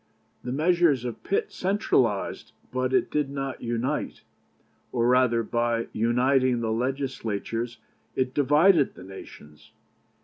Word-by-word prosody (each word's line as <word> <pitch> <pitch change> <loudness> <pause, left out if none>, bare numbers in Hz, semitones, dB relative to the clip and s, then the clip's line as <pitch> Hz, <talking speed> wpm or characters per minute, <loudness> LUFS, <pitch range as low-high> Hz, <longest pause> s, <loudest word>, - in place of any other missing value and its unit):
The 125 - -4
measure 170 +5 +3
of 125 -4 -2
Pitt 200 - -1
centralized, 135 - 0 0.2
but 130 0 -1
it 130 - +1
did 150 -2 0
not 135 -2 -4
unite, 120 +1 -2 0.7
or 120 -1 +1
rather, 125 -2 +3
by 120 0 -1
uniting 125 +2 +2
the 110 -1 -1
Legislatures 120 -2 -3 0.4
it 130 0 0
divided 150 +2 +4
the - - -11
nations. 75 -5 -13
125 Hz, 115 wpm, -26 LUFS, 115-140 Hz, 0.7 s, divided